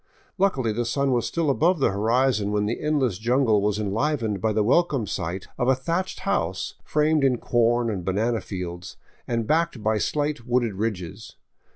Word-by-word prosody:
Luckily, 135 Hz, -, +1 dB
the 120 Hz, +3 st, -1 dB
sun 135 Hz, +4 st, 0 dB
was 120 Hz, -2 st, +1 dB
still 165 Hz, -4 st, 0 dB
above 170 Hz, +6 st, +2 dB
the 135 Hz, -, +2 dB
horizon 110 Hz, +1 st, +1 dB
when 105 Hz, 0 st, +1 dB
the 110 Hz, +3 st, -2 dB
endless 135 Hz, -10 st, 0 dB
jungle 120 Hz, -2 st, +2 dB
was 105 Hz, 0 st, 0 dB
enlivened 110 Hz, 0 st, -1 dB
by 110 Hz, -, +1 dB
the 105 Hz, 0 st, +1 dB
welcome 135 Hz, 0 st, +2 dB
sight 90 Hz, 0 st, -4 dB
of 125 Hz, -, +1 dB
a 130 Hz, -, +5 dB
thatched 170 Hz, +8 st, -3 dB
house -, -, -1 dB
framed 150 Hz, 0 st, +2 dB
in 130 Hz, -2 st, +3 dB
corn 120 Hz, 0 st, +1 dB
and 100 Hz, -5 st, -3 dB
banana 110 Hz, +5 st, 0 dB
fields 90 Hz, -2 st, -6 dB, 0.3 s
and 115 Hz, -2 st, -1 dB
backed 160 Hz, -5 st, 0 dB
by 110 Hz, 0 st, +1 dB
slight 145 Hz, -2 st, -1 dB
wooded 120 Hz, -2 st, 0 dB
ridges. 95 Hz, -4 st, -4 dB
120 Hz, 175 wpm, -24 LUFS, 105-140 Hz, 0.3 s, a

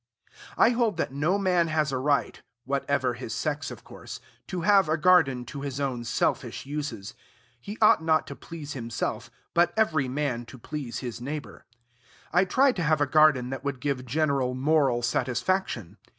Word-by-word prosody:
I -, -, +5 dB
hold 230 Hz, -6 st, +1 dB
that -, -, -1 dB
no 155 Hz, +8 st, +1 dB
man 180 Hz, -4 st, +2 dB
has 155 Hz, -2 st, 0 dB
a 130 Hz, -, -1 dB
right 140 Hz, +1 st, 0 dB, 0.2 s
(whatever 140 Hz, -1 st, 0 dB
his 120 Hz, -2 st, -6 dB
sex, 150 Hz, +6 st, -2 dB
of -, -, -10 dB
course) -, -, -10 dB, 0.3 s
to 185 Hz, -3 st, -4 dB
have 195 Hz, -2 st, +4 dB
a 155 Hz, -, +2 dB
garden 150 Hz, -7 st, +4 dB
to 140 Hz, +3 st, -7 dB
his 140 Hz, -1 st, -4 dB
own 130 Hz, -4 st, -2 dB
selfish 115 Hz, -, -1 dB
uses. 135 Hz, -8 st, -5 dB, 0.5 s
He 205 Hz, -, -8 dB
ought 215 Hz, -, +6 dB
not 160 Hz, -1 st, +2 dB
to -, -, -8 dB
please 155 Hz, -3 st, -8 dB
himself, 115 Hz, -2 st, -4 dB, 0.2 s
but 175 Hz, 0 st, +4 dB
every 155 Hz, -11 st, +2 dB
man 125 Hz, -3 st, -2 dB
to 130 Hz, -, -11 dB
please 130 Hz, 0 st, -6 dB
his 120 Hz, -1 st, -6 dB
neighbor. 145 Hz, +3 st, -6 dB, 0.7 s
I 180 Hz, +3 st, +4 dB
tried 260 Hz, +5 st, +3 dB
to 175 Hz, -, 0 dB
have 155 Hz, -1 st, +2 dB
a 145 Hz, -, +3 dB
garden 140 Hz, -3 st, +4 dB
that 135 Hz, 0 st, -5 dB
would 140 Hz, -2 st, -3 dB
give 130 Hz, -2 st, -2 dB
general 135 Hz, -2 st, 0 dB
moral 135 Hz, -3 st, +2 dB
satisfaction. 125 Hz, -, -1 dB
145 Hz, 175 wpm, -27 LUFS, 125-165 Hz, 0.7 s, ought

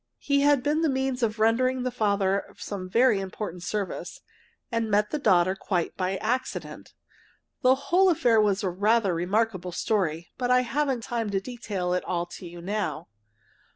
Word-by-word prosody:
He 280 Hz, -1 st, +1 dB
had 285 Hz, -2 st, +4 dB
been 300 Hz, +2 st, +1 dB
the 320 Hz, -, +2 dB
means 265 Hz, -1 st, -1 dB
of 225 Hz, -2 st, 0 dB
rendering 250 Hz, +4 st, +2 dB
the 255 Hz, -, -1 dB
father 200 Hz, -4 st, +1 dB
some 185 Hz, -3 st, -6 dB
very 230 Hz, 0 st, +4 dB
important 190 Hz, -2 st, -5 dB
service, 200 Hz, +2 st, -4 dB, 0.5 s
and 230 Hz, -1 st, -1 dB
met 210 Hz, 0 st, +2 dB
the 300 Hz, -, -1 dB
daughter 185 Hz, -6 st, +3 dB
quite 180 Hz, -3 st, -2 dB
by 185 Hz, +1 st, -1 dB
accident. 250 Hz, +6 st, -4 dB, 0.7 s
The 255 Hz, +1 st, +5 dB
whole 355 Hz, +8 st, +3 dB
affair 240 Hz, -9 st, +3 dB
was 205 Hz, -1 st, +1 dB
a 190 Hz, -, +1 dB
rather 205 Hz, +1 st, +2 dB
remarkable 185 Hz, +1 st, -1 dB
story, 170 Hz, -3 st, -1 dB
but 245 Hz, -1 st, -1 dB
I 250 Hz, 0 st, +5 dB
haven't 265 Hz, -1 st, -1 dB
time 230 Hz, -2 st, -2 dB
to 195 Hz, -1 st, 0 dB
detail 200 Hz, -5 st, -4 dB
it 180 Hz, -, 0 dB
all 175 Hz, -1 st, -2 dB
to 175 Hz, +1 st, -10 dB
you 170 Hz, 0 st, -10 dB
now. 205 Hz, +2 st, -3 dB
215 Hz, 170 wpm, -26 LUFS, 190-250 Hz, 0.7 s, The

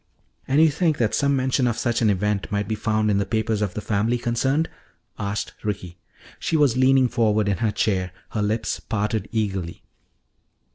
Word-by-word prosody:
"And 140 Hz, +3 st, +3 dB
you 160 Hz, -1 st, +6 dB
think 160 Hz, 0 st, +1 dB
that 115 Hz, -3 st, +1 dB
some 140 Hz, -1 st, +2 dB
mention 130 Hz, -1 st, +1 dB
of 115 Hz, -, -1 dB
such 120 Hz, -2 st, 0 dB
an 110 Hz, -, +4 dB
event 105 Hz, 0 st, 0 dB
might 100 Hz, -1 st, -1 dB
be 110 Hz, -, -1 dB
found 110 Hz, 0 st, 0 dB
in 100 Hz, -, +2 dB
the -, -, +2 dB
papers 110 Hz, 0 st, 0 dB
of 100 Hz, -4 st, -2 dB
the 105 Hz, -, -3 dB
family 110 Hz, +4 st, 0 dB
concerned?" 130 Hz, +6 st, 0 dB, 0.5 s
asked 100 Hz, +2 st, -3 dB
Ricky. 95 Hz, -4 st, -4 dB, 0.4 s
She 160 Hz, -, 0 dB
was 145 Hz, -6 st, +3 dB
leaning 130 Hz, 0 st, +4 dB
forward 110 Hz, -4 st, +1 dB
in 100 Hz, -2 st, +1 dB
her 115 Hz, -2 st, +1 dB
chair, 95 Hz, -3 st, 0 dB, 0.2 s
her 110 Hz, -, -2 dB
lips 105 Hz, +2 st, -1 dB
parted 105 Hz, 0 st, -2 dB
eagerly. 95 Hz, -7 st, -2 dB
110 Hz, 185 wpm, -23 LUFS, 105-125 Hz, 0.5 s, you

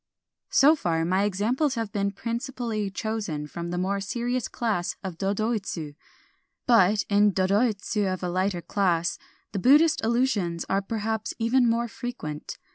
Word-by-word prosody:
So 300 Hz, +4 st, +6 dB
far, 165 Hz, -, 0 dB
my 185 Hz, +3 st, +2 dB
examples 240 Hz, +9 st, 0 dB
have 225 Hz, -3 st, -3 dB
been 200 Hz, -1 st, 0 dB
principally 230 Hz, 0 st, -3 dB
chosen 200 Hz, -7 st, -3 dB
from 170 Hz, +3 st, -6 dB
the 175 Hz, -, -3 dB
more 195 Hz, +2 st, 0 dB
serious 240 Hz, +4 st, -2 dB
class 210 Hz, -7 st, -2 dB
of 180 Hz, -3 st, -6 dB
dodoitsu. 200 Hz, -6 st, -2 dB, 0.7 s
But 210 Hz, -3 st, +4 dB
in 205 Hz, 0 st, +4 dB
dodoitsu 200 Hz, +1 st, +1 dB
of 185 Hz, 0 st, -4 dB
a -, -, 0 dB
lighter 185 Hz, 0 st, -1 dB
class 175 Hz, -2 st, 0 dB, 0.3 s
the 200 Hz, -, -2 dB
Buddhist 295 Hz, -, +5 dB
allusions 220 Hz, -8 st, 0 dB
are 195 Hz, +1 st, +1 dB
perhaps 220 Hz, +1 st, -3 dB
even 240 Hz, +2 st, +3 dB
more 235 Hz, +1 st, +1 dB
frequent. 225 Hz, -11 st, -6 dB
205 Hz, 140 wpm, -26 LUFS, 185-235 Hz, 0.7 s, So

